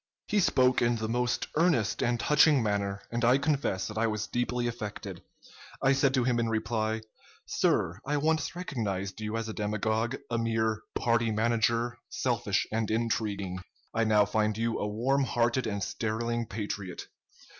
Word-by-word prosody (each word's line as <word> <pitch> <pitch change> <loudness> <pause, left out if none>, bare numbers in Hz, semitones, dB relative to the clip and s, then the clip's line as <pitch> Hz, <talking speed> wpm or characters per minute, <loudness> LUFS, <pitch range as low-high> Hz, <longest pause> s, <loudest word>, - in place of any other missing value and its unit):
"He 210 - +1
spoke 130 -8 +3
in 120 0 +3
the 110 -1 -3
most 120 +1 0
earnest 150 - +2
and 120 0 +1
touching 150 -2 +5
manner, 100 -2 -1
and 120 +1 -2
I 125 +3 +5
confess 140 -10 0
that 110 0 -4
I 115 - +3
was 110 -1 -2
deeply 120 0 -1
affected. 110 -4 -5 0.6
I 135 - +4
said 135 0 +3
to 130 - +2
him 120 -1 +1
in 115 -1 0
reply: 110 0 -1 0.4
'Sir, 85 +4 +1
I 145 +2 0
once 155 +3 0
recognized 105 - -3
you 110 +1 -2
as 115 -1 -3
a 110 - -4
demagogue, 110 +3 -1 0.2
a 115 - +1
mere 110 -1 0
party 115 -1 +2
manager, 115 +2 +1
selfish 115 -6 0
and 110 -1 -1
intriguing. 105 -4 -1 0.3
I 115 - +2
now 105 -1 +4
find 105 0 0
you 115 0 -1
a 105 - -1
warm 130 +7 +1
hearted 120 0 +1
and 100 -2 -2
sterling 115 +1 -2
patriot. 100 -4 -5
115 Hz, 165 wpm, -29 LUFS, 110-120 Hz, 0.6 s, touching